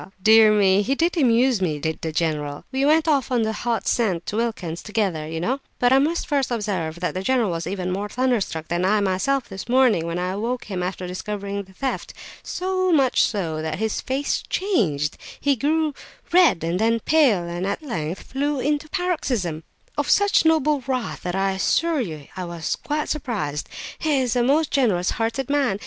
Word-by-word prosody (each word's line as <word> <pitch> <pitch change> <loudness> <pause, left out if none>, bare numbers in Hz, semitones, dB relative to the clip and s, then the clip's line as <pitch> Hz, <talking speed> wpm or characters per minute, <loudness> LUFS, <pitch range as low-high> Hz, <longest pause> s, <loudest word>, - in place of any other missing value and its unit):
dear 220 0 +7
me! 200 -2 +4
He 265 +7 0
did 335 +5 +1
amuse 250 - +3
me, 160 -5 0
did 160 +2 -3
the 160 - -3
general! 150 -3 -2
We 265 +1 0
went 315 +2 +3
off 280 -5 +2
on 240 -2 +2
the 220 0 -1
hot 235 +1 -2
scent 190 -8 +1
to - - -4
Wilkin's 205 -8 -2
together, 195 -8 -1
you 160 +1 -4
know; 250 +11 -1 0.2
but 245 +1 +3
I 265 - +6
must 320 +5 0
first 280 -3 0
observe 190 -8 -2
that 180 - -1
the 185 - -3
general 235 -1 +1
was 165 0 -3
even 185 -2 -3
more 200 +3 -3
thunderstruck 230 -11 -1
than 175 +1 0
I 210 +3 +3
myself 200 +8 0
this 195 - -8
morning, 245 -10 +3
when 170 +1 -3
I 180 +1 -1
awoke 230 +6 -2
him 190 -3 -4
after 185 0 -3
discovering 200 +2 -4
the 190 -1 -15
theft; 265 +7 -4 0.3
so 370 0 -1
much 270 -6 +3
so 165 -7 -1
that 155 0 -3
his 220 +1 -1
very 265 +2 -2
face - - 0
changed—he 235 - 0
grew 305 +4 +1 0.4
red 350 - +5
and 170 +2 -1
then 230 +1 +2
pale, 270 - +3
and 175 +2 -3
at 255 - -3
length 175 - -4
flew 285 +1 -2
into 295 +2 0
a - - -27
paroxysm 265 - -1 0.4
of 290 - -1
such 405 -4 +4
noble 305 -3 +3
wrath 255 -3 -2
that 180 0 -3
I 195 0 +1
assure 310 - +1
you 155 - -6
I 185 - -4
was 170 -2 -3
quite 300 0 -3
surprised! 205 - -3 0.3
He 305 -4 +1
is 255 -2 0
a 245 - +3
most 290 +5 +2
generous 205 -10 +2
hearted 230 +3 -2
man! 280 -8 +1
220 Hz, 195 wpm, -23 LUFS, 180-275 Hz, 0.4 s, dear